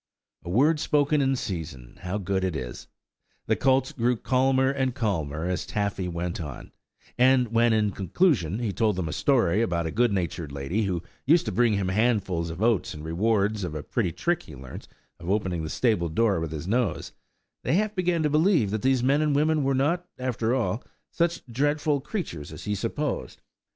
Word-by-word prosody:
A 85 - -7
word 145 - +3
spoken 150 -1 +2
in 135 0 +2
season, 80 - -6
how 95 +2 -3
good 95 -1 -1
it 95 -3 -1
is! 60 -5 -6 0.6
The - - +2
colts 130 -1 +2
grew 120 0 0
calmer 130 +2 +2
and 130 -2 -1
calmer 80 - -2
as 90 -2 -1
Taffy 100 -3 -2
went 85 0 -3
on, 75 -5 -8 0.5
and 125 -1 +4
when, 115 +1 +3
in 105 -2 +2
conclusion, 100 - +1
he 115 -4 -2
told 110 -2 +1
them 90 -3 -2
a 75 - -4
story 115 -8 +2
about 85 -7 0
a 80 - -2
good 120 +3 +2
natured 85 -5 -2
lady, 70 +11 -2
who 90 -3 -2 0.2
used 165 +4 +5
to 110 - -2
bring 115 +2 +3
him 100 -2 0
handfuls 95 -5 +1
of 85 +6 -4
oats 110 -9 +1
in 75 - -9
reward 100 +5 +1
of 85 -4 -4
a 75 - -4
pretty 100 -3 -1
trick 175 - -1
he 75 - -12
learnt 65 -1 -10 0.3
of 85 - -7
opening 95 -4 0
the 80 - -4
stable 95 -5 +1
door 100 +3 +2
with 80 -1 -4
his 80 +2 -5
nose, 115 -1 0 0.5
they - - +1
half 215 +2 +1
began 180 -4 0
to 150 - +2
believe 155 - +3
that 110 -1 -2
these 130 -2 +2
men 140 +4 +3
and 150 -2 +1
women 155 +1 +2
were 135 0 +1
not, 170 +7 0
after 125 -2 -1
all, 125 -2 -1 0.3
such 170 0 0
dreadful 145 +4 0
creatures 130 - -5
as - - -9
they 105 - -2
had 105 - -1
supposed. 145 +6 -3
110 Hz, 195 wpm, -26 LUFS, 90-135 Hz, 0.6 s, used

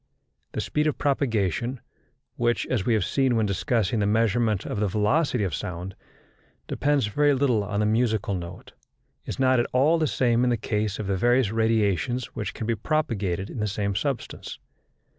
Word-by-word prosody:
The - - -2
speed 150 +1 0
of 150 - -1
propagation, 120 - 0 0.6
which, 120 0 +1
as 115 -7 -1
we 115 - +4
have 105 -5 +1
seen 135 -3 +1
when 110 -1 +2
discussing 110 +1 0
the 100 - +1
measurement 110 -1 +1
of 105 - -3
the 105 - +1
velocity 110 - +1
of 95 -5 -2
sound, 90 +6 -5 0.7
depends 145 -4 +1
very 145 +7 +2
little 125 -6 +2
on 100 +1 -2
the - - +2
musical 110 -2 +1
note, 90 0 -7 0.6
is - - -4
not 130 -1 +3
at 120 - +1
all 150 +6 +4
the 155 - +2
same 120 -3 +2
in 125 - +3
the 120 - +1
case 105 -2 -2
of 105 - -4
the 95 -1 0
various 120 +1 +3
radiations 110 +2 0
which 105 -4 -4
can 110 - -4
be 115 - +1
propagated 105 - -1
in - - -6
the 105 - 0
same 100 0 -1
substance. 135 +5 -4
110 Hz, 180 wpm, -25 LUFS, 100-130 Hz, 0.7 s, we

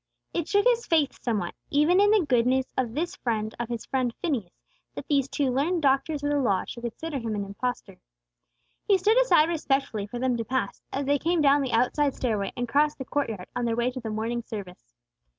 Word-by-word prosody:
It 340 -2 -2
shook 405 +1 +2
his 475 -1 +3
faith 310 -4 +2
somewhat, 210 -8 -1 0.2
even 300 +6 +4
in 410 - +5
the 420 -5 +4
goodness 255 +1 +2
of 245 -3 -1
this 340 +4 -2
friend 220 -2 -2
of 240 -1 -3
his 235 -2 -4
friend 255 -2 0
Phineas, 250 - -3 0.4
that - - -7
these 280 -3 +2
two 275 -2 0
learned 315 +6 0
doctors 280 +2 +1
of 290 - 0
the 290 - +2
Law 200 -8 +1
should 235 - -8
consider 275 +5 -4
Him 225 -3 -3
an 200 -1 -2
impostor. 245 +6 -5 0.9
He 400 - +5
stood 425 +6 +3
aside 325 -11 +5
respectfully 275 -10 -1
for 240 - -6
them 250 0 0
to 230 - -2
pass, 260 +4 -2
as 275 +1 -2
they 285 +1 +2
came 340 +3 +1
down 285 -1 +4
the 265 -2 -2
outside 260 +4 +2
stairway, 210 -6 -1
and 245 0 -2
crossed 295 +4 +2
the 265 - -6
court 285 -1 -1
yard 195 -5 -6
on 245 -1 -1
their 230 -1 0
way 240 +2 0
to 255 - -6
the 230 -3 -5
morning 225 +2 -2
service. 180 - -9
260 Hz, 220 wpm, -26 LUFS, 230-295 Hz, 0.9 s, in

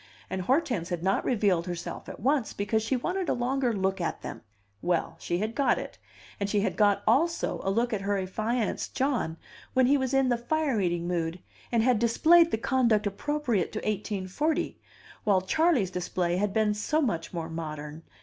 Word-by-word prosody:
And 190 - -2
Hortense 240 - 0
had 175 -2 -3
not 195 +1 +1
revealed 195 -7 +1
herself 175 -1 -5
at - - -8
once, 265 0 +1
because 210 +2 0
she 240 +5 0
wanted 360 +7 -2
a - - +2
longer 250 +1 0
look 190 -2 -1
at 170 - -3
them. - - -6 0.4
Well, 175 -2 0
she 175 - -1
had 215 +4 -2
got 275 +3 +2
it, - - -7 0.4
and 200 0 -1
she 205 -1 +2
had 210 - -1
got 205 -1 +3
also 335 +4 +1
a 195 - 0
look 235 +4 +1
at 205 - -1
her 200 0 0
affianced 215 +5 -2
John 250 - 0 0.4
when 260 0 +5
he 280 +3 +4
was 260 -1 -1
in 270 -1 +3
the 240 -1 +1
fire 275 -2 0
eating 175 -1 -1
mood, 170 0 -2 0.3
and 230 -2 +3
had 245 -2 +3
displayed 325 +9 +5
the 220 - 0
conduct 230 -3 +2
appropriate 235 - -1
to - - -2
1840, 210 - -2 0.4
while 200 -3 +4
Charley's 250 - +2
display 180 -1 -1
had 205 +1 0
been 215 0 +2
so 260 +9 0
much 175 - -1
more 165 -2 -4
modern. 155 -1 -6
210 Hz, 190 wpm, -28 LUFS, 185-255 Hz, 0.4 s, when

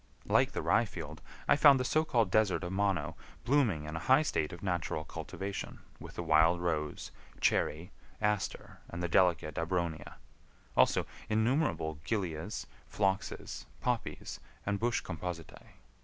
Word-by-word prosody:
Like - - +3
the - - -2
rye 120 - +4
field, 80 -6 -8 0.3
I - - +6
found 145 -2 +7
the 125 - 0
so 155 +4 +3
called 115 - +1
desert 105 -3 +3
of 90 - -3
Mono 95 -5 0 0.3
blooming 120 - +2
in 75 +1 -6
a - - -2
high 135 +4 +7
state 75 - -1
of 85 +1 -9
natural 85 -4 -1
cultivation 100 +4 -5 0.2
with - - -10
the 85 - -3
wild 80 +2 +4
rose, 80 -4 -2 0.3
cherry, 80 +5 +1 0.3
aster, 105 -2 -1
and 85 0 -5
the - - +1
delicate 85 -4 +2
abronia; 85 -1 -2 0.6
also - - +4 0.2
innumerable 110 - +1
gilias, 80 -4 -2 0.3
phloxes, 95 -1 -1
poppies, - - -2 0.3
and 100 0 0
bush 120 +1 +1
compositae. 85 -1 -6
90 Hz, 140 wpm, -32 LUFS, 80-110 Hz, 0.6 s, found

